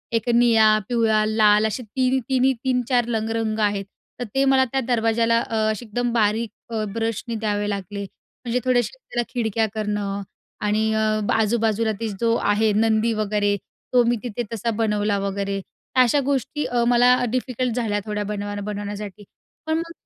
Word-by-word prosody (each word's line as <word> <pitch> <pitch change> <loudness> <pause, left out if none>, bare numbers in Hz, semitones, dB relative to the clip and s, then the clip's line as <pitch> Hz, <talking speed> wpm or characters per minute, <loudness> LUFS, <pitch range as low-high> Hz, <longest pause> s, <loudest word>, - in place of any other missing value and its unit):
एक 230 +1 0
निळा, 225 -3 +5
पिवळा, 225 -3 +2
लाल 215 -1 +4
असे 235 +4 -4
तिनी-तिनी 260 +2 +1
3-4 250 -2 +1
लंग 225 -2 -1
रंग 220 -1 -1
आहेत. 205 -2 0 0.3
तर - - -2
ते 270 - +3
मला 265 -1 +4
त्या 270 - 0
दरवाजाला 230 -1 +2
अ, 225 - -4 0.2
असे 215 +3 -5
एकदम 240 +2 -2
बारीक 220 0 +1 0.2
अ, 220 -1 -1
ब्रशने 230 +1 -2
द्यावे 205 -1 -1
लागले, 200 0 -4 0.4
म्हणजे 240 +1 0
थोड्याशा 250 - +1
त्याला 240 - -3
खिडक्या 225 -2 0
करणं 205 -2 -2 0.4
आणि 215 +1 +1
अ, 215 0 +1
ब - - -1
आजूबाजूला 225 0 +1 0.3
जो 230 0 +3
आहे, 210 +1 +2
नंदी 220 +1 +2
वगैरे, 210 -1 0 0.4
तो 245 -1 +6
मी 240 +1 +2
तिथे 240 0 -3
तसा 230 +1 -1
बनवला 210 -2 +1
वगैरे. 195 0 -2 0.4
अशा 250 +4 +2
गोष्टी 280 +2 -1
अ, 245 -1 0
मला 245 +1 +5 0.2
डिफिकल्ट 255 -1 -1
झाल्या, 220 -4 0
थोड्या 210 -1 -2
बनवाय 205 0 -4
बनवण्यासाठी. 205 -1 -6 0.4
पण 315 0 +1
मग 335 0 -4
225 Hz, 160 wpm, -23 LUFS, 210-240 Hz, 0.4 s, तो